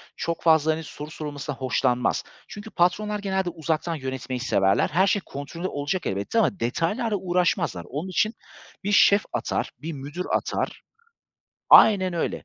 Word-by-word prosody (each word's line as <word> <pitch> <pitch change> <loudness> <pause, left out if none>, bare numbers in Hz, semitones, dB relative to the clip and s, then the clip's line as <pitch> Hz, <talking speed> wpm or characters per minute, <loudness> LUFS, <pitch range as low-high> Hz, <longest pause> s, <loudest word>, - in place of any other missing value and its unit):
çok 170 0 -3
fazla, 160 -1 +4
hani, 160 +1 -3
soru 150 0 -9
sorulmasından 145 -3 -6
hoşlanmaz. 125 -1 0 0.2
Çünkü 205 +1 -9
patronlar 210 +4 +1
genelde 190 -2 -1
uzaktan 165 0 -2
yönetmeyi 130 -2 -4
severler. 95 -4 +2
Her 185 +6 +3
şey 205 - +2
kontrollü 155 +6 -6
olacak 145 +4 -3
elbette 100 - -1
ama 200 -3 +1
detaylarla 205 - -1
uğraşmazlar. 175 - 0
Onun 150 +8 -4
için 215 +4 +1 0.5
bir 205 - -1
şef 205 0 +5
atar, - - -2
bir 160 +2 -4
müdür 145 +6 -6
atar. - - -2 0.9
Aynen 190 -4 +7
öyle. 170 - -2
165 Hz, 145 wpm, -25 LUFS, 145-190 Hz, 0.9 s, Aynen